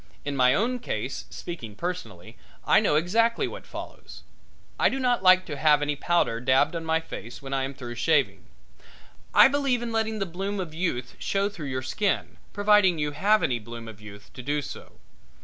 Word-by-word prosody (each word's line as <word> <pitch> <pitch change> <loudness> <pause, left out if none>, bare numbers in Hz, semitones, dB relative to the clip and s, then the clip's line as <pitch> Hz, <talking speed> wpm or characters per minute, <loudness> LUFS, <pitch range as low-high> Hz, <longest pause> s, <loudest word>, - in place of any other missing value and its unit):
In 145 -1 -2
my 130 0 +4
own 245 +6 0
case, 130 - -4
speaking 115 -12 -7
personally, 175 - -6 0.3
I - - +5
know - - +2
exactly 225 +9 +2
what - - -9
follows. - - -10 0.6
I - - +5
do 270 - -3
not 250 -4 +1
like 185 0 +6
to 150 -4 -6
have 150 0 +4
any 145 0 -1
powder 145 -6 +1
dabbed 130 +6 +3
on 165 - -3
my 160 0 +1
face 120 -7 -9
when 135 -1 -7
I 135 -1 0
am 135 +1 -7
through 120 -2 -7
shaving. 120 - +1 0.9
I - - +8
believe 270 -3 0
in 235 - -4
letting 220 -1 -1
the 195 - -1
bloom 195 +3 -4
of 170 -4 -5
youth 155 -8 -3
show 200 +1 0
through 170 -8 -7
your 130 0 -3
skin, 200 +9 -1
providing 205 -3 +4
you 150 -1 -1
have 205 +9 +2
any 120 -2 +1
bloom 115 +1 -9
of 110 -1 -11
youth 100 0 -12
to - - -8
do 145 +3 -1
so. - - -9
160 Hz, 195 wpm, -26 LUFS, 130-200 Hz, 0.9 s, I